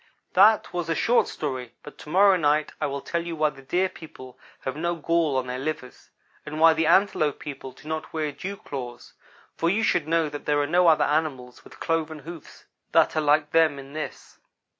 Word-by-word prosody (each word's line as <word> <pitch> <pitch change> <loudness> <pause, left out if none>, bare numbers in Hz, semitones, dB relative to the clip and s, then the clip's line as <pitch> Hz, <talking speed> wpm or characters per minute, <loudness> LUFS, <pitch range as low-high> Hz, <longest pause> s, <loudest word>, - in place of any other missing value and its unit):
"That 210 +3 +5
was 175 -1 -3
a 165 - +1
short 240 +9 +2
story, 130 -5 -5
but 150 - -12
to - - -11
morrow 195 +3 +5
night 150 -3 +1
I - - +1
will 140 0 -4
tell 170 +3 -3
you 170 -1 -5
why 155 -1 +1
the 135 -1 -14
Deer 180 +8 0
people 130 -8 -12 0.3
have 130 - -4
no 170 +3 -1
gall 165 -3 0
on 130 - -1
their 125 0 -4
livers; 145 -2 -6 0.3
and 155 +1 -6
why 165 0 +7
the 160 0 0
Antelope 160 -7 +3
people 135 -2 -8
do 135 +4 -16
not 155 0 -4
wear 155 -2 -2
dew 195 +7 -6
claws, 125 -7 -8 0.4
for 165 - +1
you 215 +5 +1
should 160 -7 +1
know 165 -1 +2
that 145 -1 -8
there 145 -1 +2
are 145 - +1
no 175 +3 +3
other 160 -2 +5
animals 140 -5 -2
with - - -16
cloven 160 -1 -1
hoofs 160 +2 -11 0.3
that - - +4
are 155 - +2
like 150 0 +2
them 160 -3 +3
in 135 0 -11
this. 155 0 -7
155 Hz, 210 wpm, -25 LUFS, 145-165 Hz, 0.4 s, why